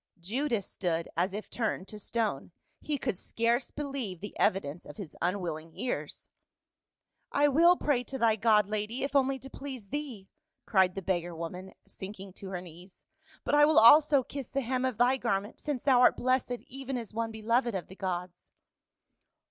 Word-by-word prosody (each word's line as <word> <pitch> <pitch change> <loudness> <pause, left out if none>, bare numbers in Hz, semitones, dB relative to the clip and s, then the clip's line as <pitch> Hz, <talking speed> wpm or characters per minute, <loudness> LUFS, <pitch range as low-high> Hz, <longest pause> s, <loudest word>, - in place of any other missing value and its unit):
Judas 230 +3 -1
stood 170 -3 -2
as 185 - +1
if 210 +2 -6
turned 215 -5 -2
to 210 - -8
stone. 210 -8 -2 0.3
He 300 -1 -2
could 195 -7 -2
scarce 235 +2 0
believe 275 - -4
the 205 - -8
evidence 175 -3 +1
of - - -11
his 195 -8 -8
unwilling 170 -3 -2
ears. 250 - -4 0.5
" - - -53
I 290 - +7
will 335 +5 +6
pray 270 -5 +1
to 265 - -5
thy 230 -3 +3
god, 215 -1 +4
lady, 215 +4 -3
if 280 +1 -3
only 270 -1 +3
to 265 - -10
please 265 -6 -8
thee,"cried 230 - -2
the 195 - -4
beggar 175 -2 -1
woman, 180 +3 -7
sinking 195 -1 -8
to 195 0 -9
her 180 -2 -4
knees; 180 +1 -14 0.4
"but - - -2
I 295 0 +7
will 310 0 +3
also 285 +4 +8
kiss 275 -1 -7
the 275 - -1
hem 255 +1 -1
of 255 -5 -1
thy 250 +2 +4
garment, 205 -4 -2
since 290 -5 -3
thou 260 -3 +5
art - - +6
blessed 250 -1 0
even 270 0 -5
as 230 -3 -7
one 230 0 -1
beloved 230 +1 0
of 180 - -3
the 190 - -12
gods." 180 -2 -4
225 Hz, 180 wpm, -30 LUFS, 190-265 Hz, 0.5 s, also